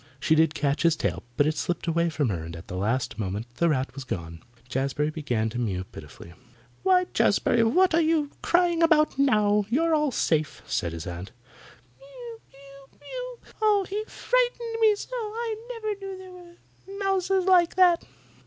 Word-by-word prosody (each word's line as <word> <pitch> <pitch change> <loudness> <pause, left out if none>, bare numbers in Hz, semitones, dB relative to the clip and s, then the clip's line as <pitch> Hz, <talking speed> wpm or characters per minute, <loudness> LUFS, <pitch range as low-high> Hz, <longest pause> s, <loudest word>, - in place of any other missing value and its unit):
She 155 - +2
did 160 0 +3
catch 145 -1 0
his 165 -1 +4
tail, - - -2 0.2
but 145 - +4
it 155 0 0
slipped 175 +4 -2
away 170 0 +1
from 150 -5 -1
her 85 -5 -3
and 85 +1 -8
the 85 +2 -8
next 115 +6 -1
moment 100 +2 -3
the 170 - +3
rat 135 -4 -1
was 135 0 -7
gone. 85 -8 -6 0.3
Jazbury 135 +4 -1
began 125 -8 -1
to 120 - -4
mew 95 -6 -2
pitifully. 80 -1 -12 0.5
"Why, 365 -1 +4
Jazbury, 235 - +3
what 360 +10 +3
are 330 - +4
you 310 -3 +1
crying 345 -1 +2
about 305 -4 +3
now? 210 -6 +3
You're 325 +7 +2
all 300 -1 +2
safe," 155 - -1
said 90 -11 -2
his 80 -1 -6
aunt. 90 +5 -7 0.7
"Mew! - - -11
mew! 275 0 -17
mew! - - -7 0.2
Oh, 415 -2 +3
he 415 +2 -3
frightened 485 -2 0
me 435 -2 +5
so! 455 - -9
I 455 -1 -3 0.2
never 435 -3 -3
knew 390 -1 -6
there 375 0 -11
were 360 +2 -14
mouses 385 -1 +1
like 360 -3 +4
that!" 355 -2 +5
275 Hz, 175 wpm, -26 LUFS, -, 0.7 s, me